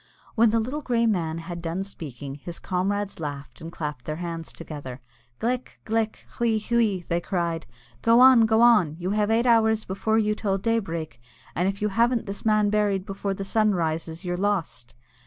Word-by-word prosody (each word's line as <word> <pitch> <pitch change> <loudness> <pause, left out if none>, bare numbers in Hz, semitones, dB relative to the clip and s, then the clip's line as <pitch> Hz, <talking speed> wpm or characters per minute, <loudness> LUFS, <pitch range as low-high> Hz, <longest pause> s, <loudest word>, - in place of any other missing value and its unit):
When 230 0 +4
the 225 +1 +2
grey 220 - -1 0.4
little 230 - +3
man 165 -5 -1
had 170 +1 -6
done 170 +3 -2
speaking, 140 -8 -8
his 170 +4 -7
comrades 200 +2 -2
laughed 145 0 -6
and 165 +1 -7
clapped 150 -7 -5
their 155 - -3
hands 165 -1 -5
together. 145 -6 -8 0.4
"Glic! 250 +2 -2
Glic! 225 0 -1
Hwee! 230 -2 +2
Hwee!" 215 -5 +1
they 170 - +1
all - - -20
cried; 170 -3 -1 0.3
"go 230 +1 +5
on, 250 -3 +8
go 220 +1 +3
on, 210 -11 +5
you 180 +2 -3
have 210 0 +1
eight 230 +2 +2
hours 220 -2 +3
before 220 +3 0
you 210 -1 +2
till 200 -2 -1
daybreak, 170 - -2 0.3
and 180 +2 0
if 195 +1 -2
you 210 - +2
haven't 235 +3 +2
this 200 0 -6
man 215 -2 +3
buried 205 -3 +1
before 195 0 -3
the 195 - -5
sun 215 0 +2
rises, 165 +1 -2
you're 175 0 -1
lost." 180 - -2
195 Hz, 190 wpm, -25 LUFS, 165-220 Hz, 0.4 s, on